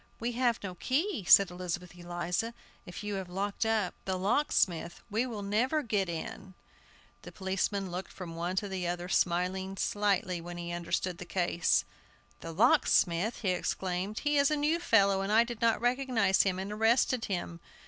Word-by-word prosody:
"We 235 Hz, +1 st, -1 dB
have 240 Hz, -2 st, 0 dB
no 185 Hz, -2 st, -4 dB
key!" 265 Hz, -, -1 dB
said 195 Hz, +1 st, +7 dB
Elizabeth 180 Hz, 0 st, -5 dB
Eliza; 175 Hz, +6 st, -3 dB, 0.3 s
"if 180 Hz, +3 st, -8 dB
you 210 Hz, 0 st, -3 dB
have 180 Hz, -, -10 dB
locked 200 Hz, +4 st, -2 dB
up 215 Hz, -4 st, +1 dB
the 190 Hz, -1 st, -1 dB
locksmith 185 Hz, -, 0 dB
we 225 Hz, +4 st, +1 dB
can 210 Hz, -5 st, -5 dB
never 255 Hz, +9 st, +1 dB
get 205 Hz, -5 st, 0 dB
in." 180 Hz, +3 st, -6 dB, 0.7 s
The -, -, -10 dB
policeman 190 Hz, 0 st, -2 dB
looked 180 Hz, +2 st, -5 dB
from 170 Hz, -3 st, -8 dB
one 175 Hz, +2 st, -2 dB
to 205 Hz, +2 st, -1 dB
the 185 Hz, -2 st, -3 dB
other, 175 Hz, 0 st, -3 dB
smiling 185 Hz, +2 st, 0 dB
slightly 195 Hz, -4 st, 0 dB
when 175 Hz, +1 st, -8 dB
he 170 Hz, 0 st, -5 dB
understood 175 Hz, +1 st, -2 dB
the 180 Hz, -, -7 dB
case. 175 Hz, -2 st, +1 dB, 0.5 s
"The 165 Hz, -, -7 dB
locksmith!" 180 Hz, +2 st, +3 dB
he 200 Hz, -, 0 dB
exclaimed; 185 Hz, +2 st, -2 dB
"he 295 Hz, -1 st, +2 dB
is 280 Hz, -, +4 dB
a 305 Hz, -, +1 dB
new 305 Hz, +3 st, +1 dB
fellow, 200 Hz, -, +3 dB
and 195 Hz, +1 st, -2 dB
I 225 Hz, +2 st, +6 dB
did 235 Hz, -1 st, -7 dB
not 230 Hz, -1 st, +3 dB
recognize 245 Hz, -5 st, +2 dB
him, 190 Hz, -2 st, 0 dB
and 190 Hz, +2 st, -4 dB
arrested 225 Hz, +3 st, +2 dB
him! 175 Hz, -3 st, -4 dB
195 Hz, 175 wpm, -30 LUFS, 180-225 Hz, 0.7 s, said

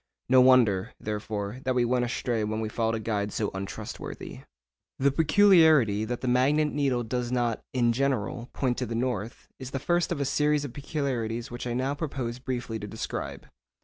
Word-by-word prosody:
No 130 Hz, 0 st, +6 dB
wonder, 120 Hz, -7 st, +4 dB
therefore, 105 Hz, +1 st, -4 dB
that 130 Hz, 0 st, 0 dB
we 125 Hz, -1 st, +3 dB
went 125 Hz, 0 st, +1 dB
astray 120 Hz, -2 st, -1 dB
when 110 Hz, +1 st, -2 dB
we 110 Hz, -1 st, -2 dB
followed 115 Hz, +1 st, 0 dB
a -, -, -2 dB
guide 105 Hz, -2 st, -2 dB
so 105 Hz, 0 st, -2 dB
untrustworthy. 95 Hz, 0 st, -6 dB, 0.6 s
The 140 Hz, +1 st, +3 dB
peculiarity 160 Hz, -, +5 dB
that 120 Hz, +2 st, -4 dB
the 130 Hz, -, -3 dB
magnet 140 Hz, +5 st, +3 dB
needle 135 Hz, -4 st, +1 dB
does 120 Hz, +1 st, -3 dB
not, 120 Hz, -3 st, 0 dB
in 120 Hz, -2 st, +2 dB
general, 125 Hz, -2 st, -1 dB
point 125 Hz, -3 st, -1 dB
to -, -, -2 dB
the 115 Hz, -, -4 dB
north, 120 Hz, -2 st, -3 dB
is 130 Hz, -1 st, -6 dB
the 135 Hz, -, -3 dB
first 175 Hz, +5 st, 0 dB
of 170 Hz, -, -1 dB
a 140 Hz, -, 0 dB
series 150 Hz, +1 st, +1 dB
of 130 Hz, -, -7 dB
peculiarities 125 Hz, -6 st, -3 dB
which 120 Hz, +1 st, -5 dB
I 120 Hz, -, -2 dB
now 130 Hz, +3 st, 0 dB
propose 135 Hz, -6 st, -4 dB
briefly 120 Hz, -3 st, -4 dB
to 105 Hz, -, -6 dB
describe. 110 Hz, +2 st, -5 dB
125 Hz, 185 wpm, -27 LUFS, 110-135 Hz, 0.6 s, No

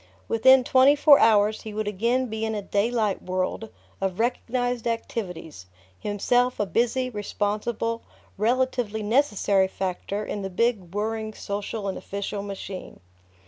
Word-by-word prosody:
Within 260 Hz, +3 st, +6 dB
twenty 265 Hz, +3 st, +5 dB
four 290 Hz, -1 st, +7 dB
hours 215 Hz, -1 st, +4 dB
he 215 Hz, -1 st, -8 dB
would 215 Hz, -1 st, -2 dB
again 235 Hz, +6 st, +1 dB
be 220 Hz, -2 st, -4 dB
in 220 Hz, 0 st, -1 dB
a 205 Hz, -, -2 dB
daylight 210 Hz, +1 st, 0 dB
world 185 Hz, +4 st, -2 dB, 0.3 s
of 190 Hz, -2 st, -1 dB
recognized 245 Hz, 0 st, -1 dB
activities, 180 Hz, -, -5 dB, 0.3 s
himself 245 Hz, +5 st, +1 dB
a 210 Hz, -, +2 dB
busy, 240 Hz, +5 st, 0 dB
responsible, 215 Hz, +1 st, -2 dB, 0.3 s
relatively 235 Hz, -1 st, 0 dB
necessary 205 Hz, -5 st, +2 dB
factor 190 Hz, +2 st, -4 dB
in 205 Hz, -, -4 dB
the 195 Hz, -, -4 dB
big 195 Hz, -2 st, -1 dB
whirring 220 Hz, +1 st, -2 dB
social 205 Hz, +1 st, -4 dB
and 190 Hz, -, -3 dB
official 200 Hz, 0 st, -4 dB
machine. 195 Hz, -2 st, -7 dB
215 Hz, 135 wpm, -25 LUFS, 200-240 Hz, 0.3 s, four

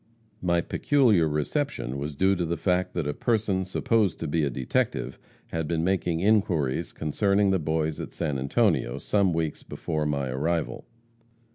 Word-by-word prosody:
My 85 Hz, -1 st, +2 dB
peculiar 110 Hz, -, +3 dB
reception 75 Hz, -, -2 dB
was 75 Hz, +1 st, -4 dB
due 95 Hz, +6 st, +3 dB
to 90 Hz, -, -1 dB
the 85 Hz, 0 st, -2 dB
fact 90 Hz, -1 st, 0 dB
that 85 Hz, -4 st, -1 dB
a 75 Hz, -, -1 dB
person 105 Hz, -1 st, 0 dB
supposed 100 Hz, 0 st, +1 dB
to 80 Hz, -, -2 dB
be 80 Hz, +2 st, +1 dB
a 70 Hz, -, +1 dB
detective, 65 Hz, -1 st, -1 dB, 0.3 s
had 80 Hz, -2 st, -2 dB
been 80 Hz, 0 st, 0 dB
making 90 Hz, -2 st, 0 dB
inquiries 85 Hz, -8 st, +1 dB
concerning 100 Hz, +6 st, +1 dB
the 95 Hz, -, +2 dB
Boys 80 Hz, 0 st, -1 dB
at -, -, -6 dB
San 75 Hz, -5 st, -2 dB
Antonio, 65 Hz, -1 st, +1 dB
some 100 Hz, +5 st, +1 dB
weeks 80 Hz, -2 st, -2 dB
before 75 Hz, -2 st, -3 dB
my 70 Hz, -3 st, -1 dB
arrival. 80 Hz, +6 st, -2 dB
85 Hz, 160 wpm, -26 LUFS, 75-95 Hz, 0.3 s, peculiar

